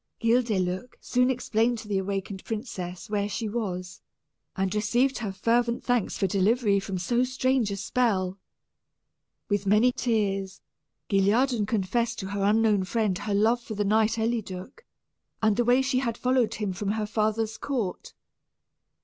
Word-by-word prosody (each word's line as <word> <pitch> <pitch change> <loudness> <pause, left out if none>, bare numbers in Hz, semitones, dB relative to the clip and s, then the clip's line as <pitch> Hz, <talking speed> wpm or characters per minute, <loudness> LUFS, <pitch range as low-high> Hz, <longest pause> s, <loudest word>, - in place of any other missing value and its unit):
Guildeluec 225 -3 0
soon 250 0 +1
explained 235 -1 +1
to 220 - -9
the 200 -2 0
awakened 195 0 -4
princess 195 -5 -5
where 205 -1 -1
she 210 +3 -3
was, 190 -5 -4 0.5
and 190 0 -1
received 240 +6 +1
her 215 -4 -3
fervent 235 +4 +1
thanks 245 -5 0
for - - +1
delivery 200 +2 +2
from 195 -1 -4
so 240 +7 +1
strange 255 -2 +1
a 200 - -3
spell. 195 -4 0 1.1
With 205 -2 -1
many 215 +5 +5
tears, 200 -6 -1 0.5
Guilliadun 210 +3 +2
confessed 225 +3 0
to 190 - -5
her 200 0 -3
unknown 210 -1 +3
friend 210 0 0
her 200 +2 -2
love 225 +4 +3
for 220 -2 -7
the 205 0 0
knight 220 +2 +2
Eliduc, 220 - -3 0.6
and 215 -2 +3
the 240 - +1
way 250 +2 +4
she 260 -1 +1
had 235 -3 -2
followed 255 -2 +1
him 205 -3 -2
from 200 +2 -2
her 215 -1 -1
father's 220 +1 -1
court. 235 -10 -3
215 Hz, 150 wpm, -27 LUFS, 195-240 Hz, 1.1 s, many